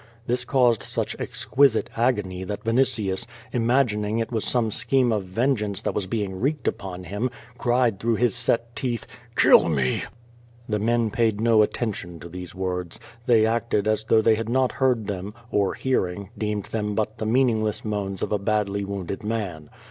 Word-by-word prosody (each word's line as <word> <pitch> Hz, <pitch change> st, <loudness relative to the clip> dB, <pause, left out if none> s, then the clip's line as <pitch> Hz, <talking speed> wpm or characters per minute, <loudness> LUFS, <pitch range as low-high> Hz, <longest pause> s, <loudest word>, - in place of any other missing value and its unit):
This 125 Hz, +1 st, -1 dB
caused 125 Hz, -5 st, +3 dB
such -, -, -3 dB
exquisite 125 Hz, -4 st, +2 dB
agony 105 Hz, -6 st, 0 dB
that 105 Hz, +2 st, -5 dB
Vinitius, 115 Hz, -5 st, +1 dB, 0.3 s
imagining 115 Hz, -3 st, +1 dB
it 115 Hz, +1 st, -2 dB
was 110 Hz, -3 st, -1 dB
some 115 Hz, -3 st, +1 dB
scheme 120 Hz, +3 st, +2 dB
of 105 Hz, -3 st, 0 dB
vengeance 105 Hz, 0 st, 0 dB
that -, -, -1 dB
was 100 Hz, -3 st, -2 dB
being 95 Hz, -3 st, -2 dB
wreaked 140 Hz, 0 st, -1 dB
upon 90 Hz, -2 st, -3 dB
him, 105 Hz, +7 st, -2 dB, 0.3 s
cried 120 Hz, -4 st, +2 dB
through 115 Hz, +1 st, +1 dB
his 120 Hz, +1 st, +2 dB
set 115 Hz, -1 st, 0 dB
teeth: 125 Hz, -4 st, -2 dB, 0.3 s
"Kill -, -, +6 dB
me!'' 70 Hz, -5 st, +1 dB, 0.7 s
The 105 Hz, -1 st, 0 dB
men 115 Hz, 0 st, +1 dB
paid 110 Hz, -2 st, +1 dB
no 115 Hz, -1 st, +5 dB
attention 100 Hz, -6 st, -2 dB
to 85 Hz, -, -9 dB
these 90 Hz, 0 st, -8 dB
words. 90 Hz, -2 st, -3 dB, 0.3 s
They 115 Hz, -3 st, +5 dB
acted 115 Hz, -2 st, 0 dB
as 110 Hz, 0 st, +1 dB
though 110 Hz, 0 st, +4 dB
they 115 Hz, -, +5 dB
had 115 Hz, +1 st, -2 dB
not 130 Hz, +1 st, +2 dB
heard 125 Hz, -5 st, +1 dB
them, 100 Hz, +1 st, -5 dB, 0.2 s
or 100 Hz, -2 st, +1 dB
hearing, 100 Hz, -6 st, -1 dB
deemed 105 Hz, -2 st, -2 dB
them 105 Hz, -2 st, -2 dB
but 110 Hz, +1 st, -2 dB
the 110 Hz, -, -2 dB
meaningless 110 Hz, -4 st, +1 dB
moans 100 Hz, -3 st, -2 dB
of -, -, -2 dB
a 105 Hz, -, +1 dB
badly 100 Hz, -1 st, 0 dB
wounded 100 Hz, -1 st, -5 dB
man. 100 Hz, -9 st, -3 dB
110 Hz, 170 wpm, -24 LUFS, 100-120 Hz, 0.7 s, Kill